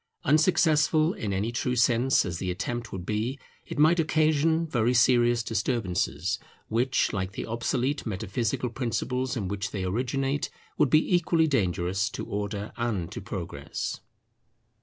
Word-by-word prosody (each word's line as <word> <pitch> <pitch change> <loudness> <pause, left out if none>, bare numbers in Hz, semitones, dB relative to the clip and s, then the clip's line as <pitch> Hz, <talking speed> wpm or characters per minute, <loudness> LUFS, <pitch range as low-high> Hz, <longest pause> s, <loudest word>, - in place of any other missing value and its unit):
Unsuccessful 155 0 +3
in 105 - -4
any 100 +4 -1
true 125 +1 -1
sense 120 +2 +3
as 85 -2 -4
the 95 - -2
attempt 110 +6 -3
would 90 -2 -6
be, 110 +6 -1 0.3
it - - -6
might 160 +4 +5
occasion 155 +1 +2
very 125 -5 +1
serious 120 -1 +4
disturbances, 110 -3 -1 0.3
which 125 +4 +1
like 95 -1 -2
the - - -4
obsolete 125 +4 -1
metaphysical 110 +3 -2
principles 125 +2 -2
in 100 -5 -2
which 100 0 -3
they 95 -1 -4
originate, 135 +8 -1 0.3
would 145 - +3
be 155 +6 +4
equally 165 -1 +3
dangerous 95 - 0
to 125 - -6
Order 100 0 -4
and 110 -8 -2
to - - -6
Progress. - - -5
120 Hz, 140 wpm, -27 LUFS, 100-140 Hz, 0.3 s, might